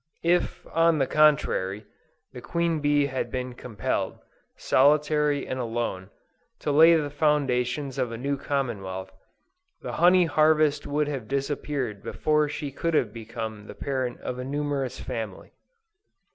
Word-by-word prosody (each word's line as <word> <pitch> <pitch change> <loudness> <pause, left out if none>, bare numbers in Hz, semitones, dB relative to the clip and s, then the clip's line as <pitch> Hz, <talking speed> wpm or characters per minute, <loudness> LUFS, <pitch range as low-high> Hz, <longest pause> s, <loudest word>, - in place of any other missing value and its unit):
If, 175 +1 +1
on 165 -1 +4
the 135 - +2
contrary, 130 -10 +2 0.5
the 125 - -8
queen 170 +1 0
bee 145 -1 +2
had 130 -2 -3
been 125 -1 -4
compelled, 120 -3 -3 0.4
solitary 150 +1 +3
and 130 - -4
alone, 115 -6 -3 0.5
to 150 - -1
lay 160 +3 +7
the 150 -3 -1
foundations 140 -3 0
of 125 - 0
a 115 - -5
new 140 +4 -1
commonwealth, 100 -10 -3 0.7
the - - -4
honey 180 +1 +6
harvest 155 -1 +3
would 150 +1 0
have 135 -7 -4
disappeared 140 -5 -2
before 150 +4 +1
she 145 -1 -5
could 165 +4 -1
have 110 -7 +1
become 110 -2 -6
the - - -9
parent 130 -3 -3
of 125 - -5
a - - -3
numerous 140 -1 -2
family. 110 -6 -6
140 Hz, 140 wpm, -26 LUFS, 120-150 Hz, 0.7 s, lay